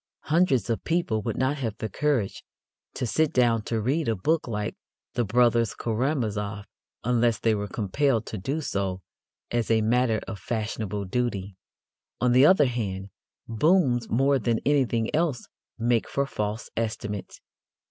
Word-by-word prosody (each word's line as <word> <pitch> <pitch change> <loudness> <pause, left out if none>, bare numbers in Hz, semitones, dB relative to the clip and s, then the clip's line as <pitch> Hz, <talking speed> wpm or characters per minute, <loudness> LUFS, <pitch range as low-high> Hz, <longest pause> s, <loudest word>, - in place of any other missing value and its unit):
Hundreds 160 -7 +3
of 115 -2 -1
people 165 -10 0
would - - -3
not 130 +3 +1
have 115 -6 -3
the 110 - -3
courage 125 -2 -1 0.5
to - - -2
sit 155 +6 +1
down 120 -3 +3
to 115 +1 -2
read 140 +9 0
a 115 - +2
book 155 - 0
like 105 -3 -3 0.4
The 120 - +1
Brothers 115 -1 +3
Karamazov 110 -5 -1 0.4
unless 120 -2 +2
they 110 +1 +2
were 105 -1 -2
compelled 115 +4 0
to 110 - -5
do 140 +11 -2
so 95 -7 -2 0.5
as 120 -2 0
a 110 -1 +4
matter 115 0 +2
of 105 -3 -6
fashionable 105 -1 -3
duty. 100 -3 -2 0.6
On 125 0 +2
the 130 +4 +7
other 185 -6 +6
hand, 100 -6 -3 0.4
booms 125 - +2
more 135 +4 +3
than 115 0 +1
anything 130 -5 +1
else 155 -7 0 0.3
make 115 0 +1
for 140 - 0
false 105 -3 -4
estimates. 110 -3 -4
115 Hz, 150 wpm, -26 LUFS, 105-130 Hz, 0.6 s, the